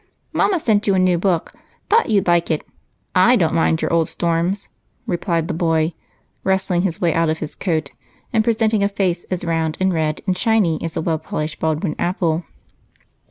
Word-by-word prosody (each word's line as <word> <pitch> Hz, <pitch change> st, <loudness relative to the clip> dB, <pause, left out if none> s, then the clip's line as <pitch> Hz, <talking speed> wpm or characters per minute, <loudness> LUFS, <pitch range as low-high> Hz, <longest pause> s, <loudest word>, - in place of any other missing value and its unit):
"Mama 375 Hz, -4 st, +2 dB
sent 215 Hz, -7 st, +1 dB
you 200 Hz, -, +3 dB
a -, -, +2 dB
new 185 Hz, -2 st, +3 dB
book 175 Hz, -3 st, 0 dB, 0.3 s
thought 455 Hz, -, +3 dB
you'd 205 Hz, -4 st, +2 dB
like 175 Hz, -1 st, +2 dB
it. 155 Hz, -2 st, -1 dB, 0.5 s
I 185 Hz, +7 st, +5 dB
don't 170 Hz, -8 st, +2 dB
mind 160 Hz, -1 st, +2 dB
your -, -, 0 dB
old 165 Hz, -2 st, +3 dB
storms!" 170 Hz, +4 st, -1 dB, 0.4 s
replied 170 Hz, -2 st, -1 dB
the -, -, -2 dB
boy, 165 Hz, -1 st, +1 dB, 0.5 s
wrestling 190 Hz, -2 st, +1 dB
his 175 Hz, -3 st, -1 dB
way 170 Hz, -3 st, +2 dB
out 165 Hz, -1 st, +2 dB
of 160 Hz, -, 0 dB
his 155 Hz, -2 st, -6 dB
coat 160 Hz, -6 st, -2 dB, 0.4 s
and 220 Hz, -1 st, +3 dB
presenting 220 Hz, -2 st, +2 dB
a 200 Hz, -, +2 dB
face 185 Hz, -3 st, -1 dB
as 180 Hz, -1 st, -4 dB
round 165 Hz, -2 st, -1 dB
and 190 Hz, 0 st, +2 dB
red 155 Hz, -2 st, -1 dB
and 185 Hz, -2 st, +1 dB
shiny 195 Hz, -7 st, +2 dB
as 165 Hz, -1 st, -4 dB
a -, -, 0 dB
well 160 Hz, -1 st, -1 dB
polished 155 Hz, 0 st, -4 dB
Baldwin 160 Hz, +1 st, -1 dB
apple. 170 Hz, -2 st, 0 dB
175 Hz, 190 wpm, -20 LUFS, 160-195 Hz, 0.5 s, I